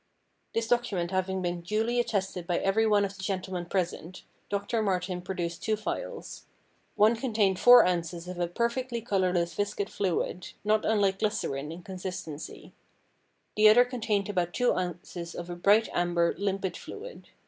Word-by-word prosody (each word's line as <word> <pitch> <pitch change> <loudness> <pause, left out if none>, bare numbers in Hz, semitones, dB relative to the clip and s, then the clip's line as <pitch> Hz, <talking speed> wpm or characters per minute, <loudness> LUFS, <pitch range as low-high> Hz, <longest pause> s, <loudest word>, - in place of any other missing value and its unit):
This 230 0 0
document 205 -8 0
having 190 0 -1
been 175 0 -2
duly 220 +6 0
attested 190 -6 -1
by 175 - +1
every 220 +3 +2
one 205 -1 +4
of 195 0 -6
the 190 - -10
gentlemen 185 -2 -3
present, 180 -1 -3 0.3
Doctor 200 +3 -1
Martin 180 -3 -1
produced 175 -2 -4
two 220 - +1
phials. - - -5 0.5
One 215 +3 +5
contained 215 -6 +1
four 245 0 +9
ounces 170 -1 -2
of 180 -1 -6
a 175 - +1
perfectly 235 +5 -2
colourless 185 -6 0
viscid 205 +1 -2
fluid, 180 -1 -2
not 215 +1 +2
unlike 200 -3 +2
glycerine 150 -9 -2
in 170 +2 -9
consistency. 180 -5 -7 0.8
The 215 0 +7
other 245 +3 +7
contained 225 -5 -1
about 180 -4 -1
two 245 -1 +3
ounces 175 -1 -5
of 175 0 -6
a - - -4
bright 205 +5 +4
amber, 175 -1 +2
limpid 195 -1 -2
fluid. 480 +4 -9
190 Hz, 155 wpm, -28 LUFS, 175-215 Hz, 0.8 s, four